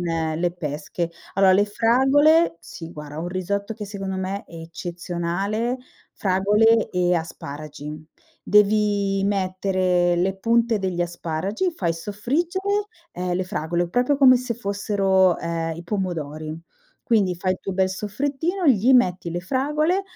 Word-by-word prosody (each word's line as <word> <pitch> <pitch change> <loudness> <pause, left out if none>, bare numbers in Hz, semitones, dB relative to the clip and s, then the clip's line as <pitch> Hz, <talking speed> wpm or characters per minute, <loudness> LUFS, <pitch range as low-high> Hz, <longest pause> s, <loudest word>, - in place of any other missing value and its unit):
le 165 0 -1
pesche. 155 +1 -4 0.2
Allora, 195 0 +5
le 200 +2 +4
fragole 265 - +4
sì 165 -1 -9
guarda 150 0 -8
un 170 +2 -3
risotto 200 +4 -3
che 210 - -6
secondo 195 -2 -5
me 190 +2 -3
è - - -16
eccezionale, 175 +7 -3 0.3
fragole 210 +4 +3
e 180 -1 +2
asparagi. 150 -2 -6 0.4
Devi 205 -1 +3
mettere 185 -2 +1
le 190 +2 0
punte 230 +1 +2
degli 185 -2 -2
asparagi, 175 - -2
fai 175 - -1
soffriggere, 335 - -1 0.3
uhm, 180 0 -2
le 185 +1 -1
fragole 175 0 -2
proprio 250 +8 +1
come 260 -2 +7
se 245 -1 -3
fossero, 200 -3 +2
uhm, 165 -1 -2
i 170 - -9
pomodori. 160 -6 -3 0.5
Quindi, 200 -7 +2
fai 185 +2 0
il 185 - -6
tuo 195 - -4
bel 190 0 +2
soffrittino, 285 - -2
gli 250 -1 +5
metti 180 -8 +2
le 175 - -2
fragole, 300 - 0
190 Hz, 135 wpm, -23 LUFS, 175-225 Hz, 0.5 s, come